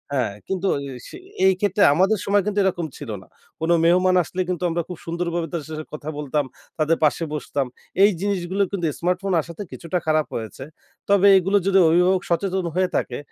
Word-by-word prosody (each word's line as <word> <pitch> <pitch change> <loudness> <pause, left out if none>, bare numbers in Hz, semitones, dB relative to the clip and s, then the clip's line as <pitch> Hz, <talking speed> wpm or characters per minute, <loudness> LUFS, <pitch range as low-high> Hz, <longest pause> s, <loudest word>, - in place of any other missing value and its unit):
হ্যাঁ, 120 -6 0
কিন্তু 190 0 -1 0.2
এ - - -7 0.2
সে - - -10 0.3
এইক্ষেত্রে 190 +1 +3
আমাদের 190 +7 +3
সময় 200 0 +2
কিন্তু 210 -1 0
এরকম 180 -3 0
ছিল 145 - -8
না। - - -21 0.3
কোন 160 +1 -2
মেহমান 185 +2 +4
আসলে 185 +4 -4
কিন্তু 180 -1 -2
আমরা 170 +1 -1
খুব 180 - -7
সুন্দরভাবে 170 0 -2
তার 170 -3 -2
সাথে 155 0 -5
কথা 150 0 -6
বলতাম, 145 0 -1 0.3
তাদের 160 +1 +2
পাশে 155 +2 +2
বসতাম। 140 -1 -2 0.4
এই 205 - +7
জিনিসগুলো 195 -1 0
কিন্তু 190 -4 -2
স্মার্টফোন 180 +2 -1
আসাতে 170 +5 -8
কিছুটা 170 +2 -3
খারাপ 155 -1 +2
হয়েছে। 115 +3 -6 0.5
তবে 200 0 +5
এগুলো 195 +2 +2
যদি 195 0 +5
অভিভাবক 180 +3 +3
সচেতন 185 +2 0
হয়ে 185 0 +2
থাকে 120 - -1
175 Hz, 180 wpm, -22 LUFS, 155-190 Hz, 0.5 s, এই